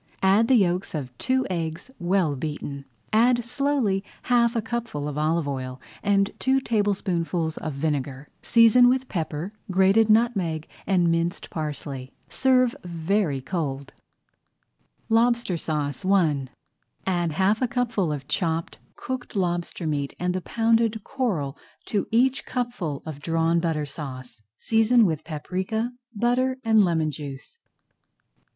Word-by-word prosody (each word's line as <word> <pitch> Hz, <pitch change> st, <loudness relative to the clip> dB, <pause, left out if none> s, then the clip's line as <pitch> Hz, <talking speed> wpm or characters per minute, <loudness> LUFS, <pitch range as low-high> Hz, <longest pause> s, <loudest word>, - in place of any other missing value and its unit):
Add 200 Hz, +4 st, +5 dB
the 260 Hz, -, +5 dB
yolks 185 Hz, -3 st, +1 dB
of 130 Hz, -5 st, -5 dB
two 260 Hz, 0 st, +1 dB
eggs, 165 Hz, +5 st, -4 dB
well 175 Hz, -4 st, +1 dB
beaten. 140 Hz, -1 st, -5 dB, 0.3 s
Add 240 Hz, +1 st, +4 dB
slowly 250 Hz, -6 st, 0 dB, 0.2 s
half 235 Hz, -1 st, +3 dB
a 230 Hz, -, +1 dB
cupful 225 Hz, -11 st, -3 dB
of 145 Hz, -, -4 dB
olive 155 Hz, +1 st, +1 dB
oil 130 Hz, -2 st, -4 dB, 0.2 s
and 200 Hz, 0 st, +2 dB
two 265 Hz, +1 st, +3 dB
tablespoonfuls 185 Hz, -8 st, -1 dB
of 155 Hz, -, -4 dB
vinegar. 140 Hz, -2 st, -2 dB
Season 235 Hz, +1 st, +6 dB
with 260 Hz, +1 st, +1 dB
pepper, 165 Hz, -1 st, -3 dB, 0.2 s
grated 195 Hz, +4 st, +4 dB
nutmeg, 200 Hz, -9 st, +2 dB, 0.2 s
and 180 Hz, -3 st, +3 dB
minced 170 Hz, +2 st, -1 dB
parsley. 145 Hz, -4 st, -5 dB, 0.2 s
Serve 255 Hz, -2 st, +3 dB
very 170 Hz, -3 st, 0 dB
cold. 140 Hz, -4 st, -4 dB, 1.2 s
LOBSTER 235 Hz, -3 st, +2 dB
SAUCE 150 Hz, -4 st, -2 dB
I 165 Hz, -8 st, +2 dB, 0.6 s
Add 175 Hz, -4 st, 0 dB
half 195 Hz, -, +2 dB
a 255 Hz, -, +2 dB
cupful 235 Hz, -, 0 dB
of 140 Hz, -2 st, -5 dB
chopped 165 Hz, +1 st, -2 dB, 0.2 s
cooked 255 Hz, -2 st, -6 dB
lobster 175 Hz, -2 st, -1 dB
[Page -, -, -1 dB
29] 150 Hz, -2 st, 0 dB
meat 140 Hz, -, -6 dB
and 180 Hz, 0 st, 0 dB
the 185 Hz, -, -2 dB
pounded 225 Hz, +1 st, +1 dB
coral 175 Hz, -, -2 dB, 0.3 s
to 205 Hz, -, -1 dB
each 255 Hz, +4 st, +2 dB
cupful 240 Hz, -, -3 dB
of 155 Hz, -3 st, -6 dB
Drawn 165 Hz, +2 st, +1 dB
Butter 160 Hz, -3 st, -1 dB
Sauce. 130 Hz, -5 st, -8 dB, 0.2 s
Season 225 Hz, +1 st, +4 dB
with 160 Hz, -4 st, -1 dB
paprika, 185 Hz, +9 st, -3 dB, 0.2 s
butter, 250 Hz, +4 st, +1 dB
and 220 Hz, -2 st, +5 dB
lemon 160 Hz, -4 st, +1 dB
juice. 145 Hz, -, -8 dB
180 Hz, 135 wpm, -25 LUFS, 155-230 Hz, 1.2 s, Season